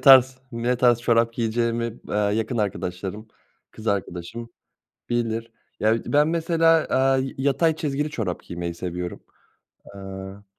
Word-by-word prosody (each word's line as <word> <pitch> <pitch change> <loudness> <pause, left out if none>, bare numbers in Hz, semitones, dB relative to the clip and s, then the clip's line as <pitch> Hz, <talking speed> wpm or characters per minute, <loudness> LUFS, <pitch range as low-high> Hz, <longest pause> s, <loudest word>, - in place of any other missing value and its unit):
tarz 130 -2 +7
ne 120 +2 0
tarz 120 -1 +4
çorap 115 0 +3
giyeceğimi 115 0 -1
b - - -8
aaa, 105 -1 +2
yakın 115 +2 -1
arkadaşlarım, 100 +1 -3 0.4
kız 110 - -11
arkadaşım 100 +3 -3 0.6
bilir. 115 -1 -1 0.3
Ya, 110 +1 +4
bir 115 - -4
de - - -6
ben 150 +1 +5
mesela, 165 -1 +3
aaa, 135 +1 +3
y 135 0 -2
yatay 145 +4 +2
çizgili 150 -1 -1
çorap 100 -10 -3
giymeyi 85 0 -4
seviyorum. 90 0 -5 0.7
Aaa 95 0 -8
115 Hz, 140 wpm, -24 LUFS, 100-130 Hz, 0.7 s, tarz